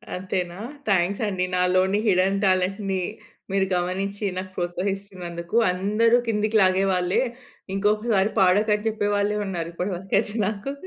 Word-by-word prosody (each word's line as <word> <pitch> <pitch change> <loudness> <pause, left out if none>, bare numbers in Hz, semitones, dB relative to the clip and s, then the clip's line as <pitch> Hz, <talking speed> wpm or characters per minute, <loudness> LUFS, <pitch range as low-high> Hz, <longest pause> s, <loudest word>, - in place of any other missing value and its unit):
అంతేనా? 180 -1 -3 0.3
థాంక్స్ 190 +2 +2
అండి. 185 -2 -1
నాలోని 185 +2 +2
హిడెన్ 195 +1 +3
టాలెంట్‌ని 190 +1 +1 0.5
మీరు 195 -1 +2
గమనించి 195 +3 -2
నాకు 185 0 -5
ప్రోత్సహిస్తున్నందుకు. 180 0 -4 0.2
అందరు 215 +6 +2
కిందకి 215 0 +1
లాగే‌వాళ్ళే. 185 0 +2 0.5
ఇంకొకసారి 210 0 +1
పాడకని 210 +3 +3
చెప్పే 205 -1 -1
వాళ్ళే 205 +1 +1
ఉన్నారు 170 -3 -3
ఇప్పటి 185 +2 -2
వరకయితే 200 +3 -1
నాకు. 215 +6 -4
195 Hz, 115 wpm, -24 LUFS, 180-205 Hz, 0.5 s, హిడెన్